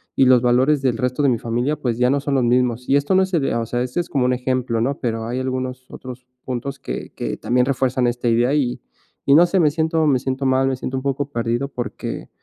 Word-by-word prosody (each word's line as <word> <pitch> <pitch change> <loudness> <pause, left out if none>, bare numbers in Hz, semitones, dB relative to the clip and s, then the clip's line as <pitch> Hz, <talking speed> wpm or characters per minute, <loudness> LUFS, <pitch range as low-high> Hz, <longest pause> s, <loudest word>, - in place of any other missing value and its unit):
y 135 - +4
los 125 -1 +5
valores 130 +4 +3
del 125 -4 0
resto 125 +4 -1
de 140 - +4
mi 120 - +1
familia, 120 +6 -1
pues, 125 -5 -2
ya 125 +1 +3
no 140 - +2
son 140 -1 -1
los 130 - +2
mismos. 125 0 +1
Y 140 - +4
esto 145 +6 +1
no 190 - +5
es 190 - -5
el, 155 -5 +1
o 115 -1 -1
sea, 120 +2 -2
esto 125 +6 -3
es - - -9
como 135 -3 +1
un 125 - +2
ejemplo, 125 -2 -1
¿no?, 135 +4 -1
pero 115 -2 -2
hay 120 +3 -3
algunos 130 0 -4
otros 125 -1 -10 0.2
puntos 130 +2 -4
que - - -6
que 60 - -4
también 125 +1 +1
refuerzan 130 -1 0
esta 120 0 -2
idea, 120 +4 +2
y 130 -5 0 0.4
y 140 - +4
no 170 +3 +7
sé, 185 +1 +1
me 150 -3 +4
siento 160 0 0
me 130 -3 +3
siento 130 +1 -3
mal, 130 0 +2
me 135 - 0
siento 130 +1 -4
un 130 - -4
poco 140 +1 -2
perdido, 120 +3 -1
porque, 125 -3 -6
130 Hz, 255 wpm, -21 LUFS, 120-140 Hz, 0.4 s, no